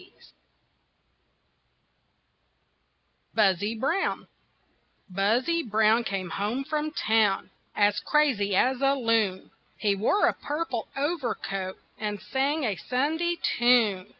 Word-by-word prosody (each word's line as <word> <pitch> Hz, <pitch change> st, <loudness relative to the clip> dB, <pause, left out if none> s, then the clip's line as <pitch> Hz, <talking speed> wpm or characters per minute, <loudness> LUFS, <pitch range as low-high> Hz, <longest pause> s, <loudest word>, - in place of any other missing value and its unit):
BUZZY 205 Hz, 0 st, +2 dB
BROWN 270 Hz, -, -1 dB, 0.9 s
Buzzy 235 Hz, -, +1 dB
Brown 220 Hz, -1 st, +2 dB
came 190 Hz, -5 st, -4 dB
home 215 Hz, +9 st, -2 dB
from 305 Hz, +2 st, -2 dB
town 220 Hz, -8 st, +1 dB, 0.2 s
As 205 Hz, 0 st, +3 dB
crazy 255 Hz, -10 st, +1 dB
as 255 Hz, +6 st, +2 dB
a 275 Hz, 0 st, +3 dB
loon, 225 Hz, -7 st, 0 dB, 0.3 s
He 205 Hz, -2 st, +1 dB
wore 220 Hz, -, +2 dB
a -, -, +2 dB
purple 290 Hz, -6 st, -4 dB
overcoat 235 Hz, -, -3 dB, 0.2 s
And 210 Hz, -1 st, -3 dB
sang 280 Hz, +7 st, -1 dB
a 210 Hz, -6 st, -1 dB
Sunday 320 Hz, +7 st, -1 dB, 0.2 s
tune. 225 Hz, -6 st, +3 dB
230 Hz, 95 wpm, -26 LUFS, 205-275 Hz, 0.9 s, As